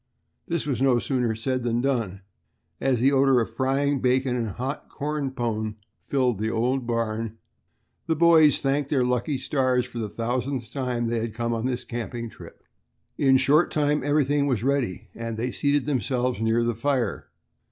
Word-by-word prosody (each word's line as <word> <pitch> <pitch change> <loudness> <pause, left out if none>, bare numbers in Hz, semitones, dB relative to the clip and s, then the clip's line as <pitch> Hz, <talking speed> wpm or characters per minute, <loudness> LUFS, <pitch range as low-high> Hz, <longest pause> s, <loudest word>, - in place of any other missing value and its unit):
This 170 -3 -1
was 135 -5 -2
no 130 -2 +4
sooner 120 -2 0
said 130 +3 -2
than 120 0 0
done, 115 -8 -1 0.6
and 135 - +1
as 120 - 0
the 135 +2 +5
odor 135 -2 +4
of 115 - -2
frying 135 +3 +1
bacon 130 0 +2
and 115 -3 -1
hot 130 - -5
"corn 150 -1 -3
pone" 110 -4 -2 0.3
filled 125 -6 0
the 110 +1 0
old 120 +3 0
barn, 115 -1 -2 0.7
the 160 - +2
boys 160 -2 +6
thanked 140 0 0
their 130 -4 +2
lucky 125 +3 0
stars 130 -2 +1
for 120 - -7
the 110 -2 -3
thousandth 120 +2 -3
time 125 -3 -1
that 115 - -2
they 120 - 0
had 110 -1 -4
come 120 0 -1
on 115 +2 -1
this 125 -1 -2
camping 115 -1 -5
trip. - - -13 0.6
In 135 -1 +5
a - - +7
short 150 +6 +4
time 150 -2 +1
everything 145 0 +2
was 120 -6 0
ready, 125 -7 -1
and 115 -1 -5
they 125 +3 -2
seated 145 +1 +1
themselves 125 -3 -1
near 115 +1 +2
the 120 0 0
fire. 120 -1 -1
125 Hz, 185 wpm, -25 LUFS, 115-140 Hz, 0.7 s, a